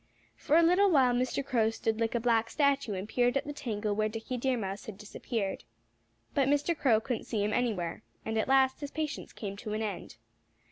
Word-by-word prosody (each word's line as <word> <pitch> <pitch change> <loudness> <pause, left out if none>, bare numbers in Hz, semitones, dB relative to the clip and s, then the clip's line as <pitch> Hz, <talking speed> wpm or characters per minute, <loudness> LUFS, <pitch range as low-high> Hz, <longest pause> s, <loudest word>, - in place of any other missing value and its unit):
For 305 +2 +2
a 335 - +6
little 365 +4 +5
while 265 -7 +4
Mr. 255 +2 -1
Crow 230 -5 +2
stood 225 0 -2
like 230 +1 0
a - - +2
black 230 -1 +2
statue 280 -6 +1
and 190 +2 -5
peered 245 +3 +2
at - - -2
the 290 - -5
tangle 215 -7 -2
where 215 +1 0
Dickie 225 +3 -5
Deer 255 +1 0
Mouse 195 -2 -4
had 210 -3 -7
disappeared. 210 0 -4 0.7
But 275 -2 +2
Mr. 290 +4 +2
Crow 245 -7 +3
couldn't 235 +1 -4
see 215 -3 -1
him 210 +1 0
anywhere. 210 -8 -1 0.2
And 220 - -2
at - - 0
last 265 0 +3
his 285 -1 -5
patience 305 0 -4
came 200 -2 -6
to 210 0 -5
an 215 +1 -1
end. 200 - -5
235 Hz, 215 wpm, -30 LUFS, 215-275 Hz, 0.7 s, a